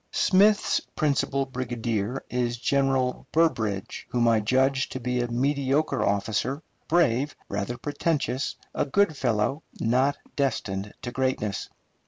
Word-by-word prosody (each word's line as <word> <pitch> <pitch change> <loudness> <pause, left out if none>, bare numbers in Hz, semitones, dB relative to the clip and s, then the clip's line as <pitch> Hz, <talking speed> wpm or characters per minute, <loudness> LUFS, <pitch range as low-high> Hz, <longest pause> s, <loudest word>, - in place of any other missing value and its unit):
Smith's 205 +3 +4 0.2
principal 140 -2 +1
brigadier 120 -2 -3
is 120 -1 -1
General 135 0 +1
Burbridge, 110 - 0
whom 120 -1 +2
I 115 -1 +4
judge 130 +5 +2
to 130 - -5
be 125 0 -1
a 120 - -1
mediocre 140 +4 +1
officer, 105 +8 0 0.2
brave, 145 -4 +2
rather 100 +4 -3
pretentious, 145 -3 -1 0.2
a - - +1
good 200 +1 +2
fellow, 125 +2 0 0.2
not 130 +5 +2 0.2
destined 105 -7 -1
to 120 - -4
greatness. 125 -6 -1
130 Hz, 120 wpm, -26 LUFS, 115-140 Hz, 0.2 s, Smith's